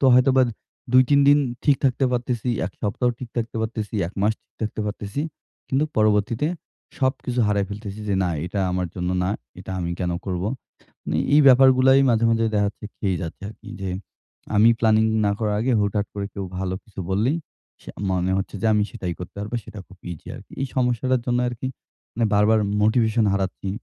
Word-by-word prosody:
তো -, -, +1 dB
হয়তোবা 130 Hz, +1 st, +5 dB, 0.5 s
২-৩ 130 Hz, +3 st, +6 dB
দিন 145 Hz, -, +7 dB, 0.3 s
ঠিক 145 Hz, -2 st, +5 dB
থাকতে 135 Hz, +1 st, +2 dB
পারতেছি, 125 Hz, 0 st, -1 dB, 0.2 s
এক 95 Hz, -, -8 dB
সপ্তাহ 110 Hz, +4 st, 0 dB
ঠিক 125 Hz, -, -7 dB
থাকতে 115 Hz, 0 st, -2 dB
পারতেছি, 110 Hz, -1 st, -4 dB
১ 90 Hz, -, -8 dB
মাস 105 Hz, -, +3 dB
ঠিক -, -, -56 dB
থাকতে 110 Hz, 0 st, -3 dB
পারতেছি। 105 Hz, +6 st, -4 dB, 0.5 s
কিন্তু 135 Hz, +3 st, +2 dB
পরবর্তীতে 110 Hz, +5 st, +2 dB, 0.5 s
সবকিছু 130 Hz, -2 st, 0 dB
হারায় 100 Hz, -1 st, +1 dB
ফেলতেছি 105 Hz, 0 st, -7 dB
যে 100 Hz, -, +1 dB
না 90 Hz, -, +1 dB, 0.2 s
এটা 100 Hz, +2 st, -2 dB
আমার 90 Hz, 0 st, -1 dB
জন্য 90 Hz, -1 st, -2 dB
না। 95 Hz, -, 0 dB, 0.3 s
এটা 95 Hz, -, -9 dB
আমি 85 Hz, -, -2 dB
কেন 90 Hz, -1 st, 0 dB
করব? 90 Hz, -2 st, -2 dB, 0.6 s
মানে -, -, -1 dB, 0.2 s
এই 150 Hz, -, +7 dB
ব্যাপারগুলাই 130 Hz, +1 st, +7 dB
মাঝে, 115 Hz, 0 st, +3 dB
মাঝে 115 Hz, 0 st, +2 dB
দেখাচ্ছে 105 Hz, +1 st, -1 dB
খেয়ে 95 Hz, -4 st, 0 dB
যাচ্ছে 85 Hz, +2 st, -6 dB
আরকি 110 Hz, -, -14 dB, 0.9 s
আমি 110 Hz, +3 st, +6 dB
প্ল্যানিং 110 Hz, -1 st, +4 dB, 0.2 s
না 100 Hz, -, +3 dB
করার 105 Hz, -2 st, 0 dB
আগে 130 Hz, -, +1 dB
হুটহাট 100 Hz, 0 st, 0 dB
করে 100 Hz, -1 st, -3 dB
কেউ 100 Hz, -, -4 dB
ভালো 95 Hz, 0 st, -2 dB
কিছু 105 Hz, -5 st, -11 dB
বললেই 115 Hz, -, +1 dB, 0.4 s
সে -, -, -12 dB, 0.2 s
মনে 90 Hz, 0 st, 0 dB
হচ্ছে 95 Hz, +2 st, -4 dB
যে -, -, -1 dB
আমি 105 Hz, -, +3 dB
সেটাই 90 Hz, -7 st, -4 dB
করতে 90 Hz, -, -8 dB
পারবো। 105 Hz, +4 st, -4 dB
সেটা 105 Hz, -, -9 dB
খুব 95 Hz, -, -16 dB
ইজি 80 Hz, -, -10 dB
আরকি। -, -, -14 dB
এই 135 Hz, -, -1 dB
সমস্যাটার 125 Hz, 0 st, +1 dB
জন্য 125 Hz, 0 st, +2 dB
আরকি 120 Hz, +2 st, -5 dB, 0.5 s
মানে 115 Hz, 0 st, +1 dB
বারবার 105 Hz, +2 st, +4 dB, 0.2 s
মোটিভেশন 110 Hz, +1 st, +3 dB
হারাচ্ছি। 95 Hz, 0 st, -2 dB
110 Hz, 180 wpm, -23 LUFS, 100-125 Hz, 0.9 s, দিন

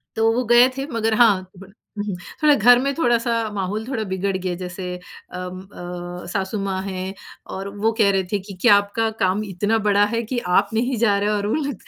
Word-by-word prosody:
तो 225 Hz, 0 st, +3 dB
वो 250 Hz, +2 st, 0 dB
गए 240 Hz, +2 st, +6 dB
थे, 270 Hz, -, -2 dB
मगर 225 Hz, -1 st, 0 dB
हाँ, 200 Hz, -6 st, +4 dB
बड़ा 195 Hz, +1 st, -14 dB, 0.2 s
हुँ, 205 Hz, -, -2 dB
हुँ, 200 Hz, -3 st, -3 dB, 0.3 s
थोड़ा 300 Hz, -1 st, +7 dB
घर 245 Hz, +2 st, +6 dB
में 275 Hz, +2 st, 0 dB
थोड़ा-सा 240 Hz, -5 st, +1 dB, 0.2 s
माहौल 205 Hz, +3 st, -3 dB
थोड़ा 240 Hz, -5 st, -2 dB
बिगड़ 190 Hz, +1 st, -1 dB
गया। 180 Hz, -1 st, -3 dB
जैसे 180 Hz, +1 st, -6 dB
अम, 180 Hz, 0 st, -9 dB
अ, 175 Hz, -2 st, -8 dB
सासु 195 Hz, +2 st, -2 dB
माँ 190 Hz, -1 st, -2 dB
हैं 190 Hz, 0 st, -4 dB, 0.4 s
और 195 Hz, +1 st, -5 dB
वो 220 Hz, +2 st, +2 dB
कह 200 Hz, -3 st, +4 dB
रहे 190 Hz, -1 st, +1 dB
थे 205 Hz, -, +1 dB
कि, 195 Hz, +1 st, -10 dB
"क्या 205 Hz, -, +7 dB
आपका 205 Hz, +3 st, 0 dB
काम 190 Hz, +3 st, +1 dB
इतना 205 Hz, +4 st, 0 dB
बड़ा 205 Hz, 0 st, +4 dB
है 230 Hz, -, +1 dB
कि 245 Hz, -, 0 dB, 0.2 s
आप -, -, -3 dB
नहीं 245 Hz, +3 st, 0 dB
जा 210 Hz, -3 st, +3 dB
रहे 205 Hz, +1 st, 0 dB
हो 210 Hz, -, +1 dB
और 205 Hz, 0 st, -2 dB
वो -, -, 0 dB
लोग" 285 Hz, -3 st, -2 dB
205 Hz, 220 wpm, -22 LUFS, 190-230 Hz, 0.4 s, थोड़ा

